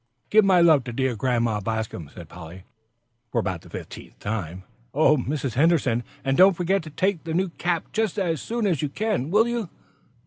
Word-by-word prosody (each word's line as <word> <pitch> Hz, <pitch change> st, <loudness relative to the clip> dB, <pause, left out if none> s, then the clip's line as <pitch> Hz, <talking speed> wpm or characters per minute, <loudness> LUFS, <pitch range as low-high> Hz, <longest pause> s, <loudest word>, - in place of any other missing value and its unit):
"Give 215 Hz, 0 st, +6 dB
my 185 Hz, -3 st, +5 dB
love 160 Hz, -6 st, +5 dB
to 120 Hz, -, -5 dB
dear 130 Hz, 0 st, 0 dB
Grandma 115 Hz, -2 st, 0 dB
Bascom," 110 Hz, -7 st, -4 dB
said 85 Hz, -2 st, -11 dB
Polly, 90 Hz, +2 st, -11 dB, 0.7 s
for -, -, -2 dB
about 95 Hz, -7 st, -1 dB
the -, -, -16 dB
fiftieth -, -, -9 dB
time. 95 Hz, -4 st, -4 dB, 0.3 s
"Oh, 155 Hz, +1 st, +5 dB
Mrs. 135 Hz, -2 st, -2 dB
Henderson, 140 Hz, -5 st, +2 dB, 0.2 s
and 135 Hz, 0 st, +1 dB
don't 185 Hz, +1 st, +6 dB
forget 190 Hz, +2 st, +1 dB
to 155 Hz, -, -10 dB
take 190 Hz, +5 st, 0 dB
over 160 Hz, -, -26 dB
the 160 Hz, -, -3 dB
new 185 Hz, +1 st, +1 dB
cap 170 Hz, 0 st, -2 dB
just 220 Hz, -3 st, -1 dB
as 170 Hz, -6 st, -1 dB
soon 235 Hz, -1 st, -2 dB
as 175 Hz, -8 st, +1 dB
you 150 Hz, -, -1 dB
can, 200 Hz, -, -2 dB
will 215 Hz, +6 st, +4 dB
you?" 235 Hz, -6 st, -3 dB
150 Hz, 200 wpm, -24 LUFS, 115-185 Hz, 0.7 s, Give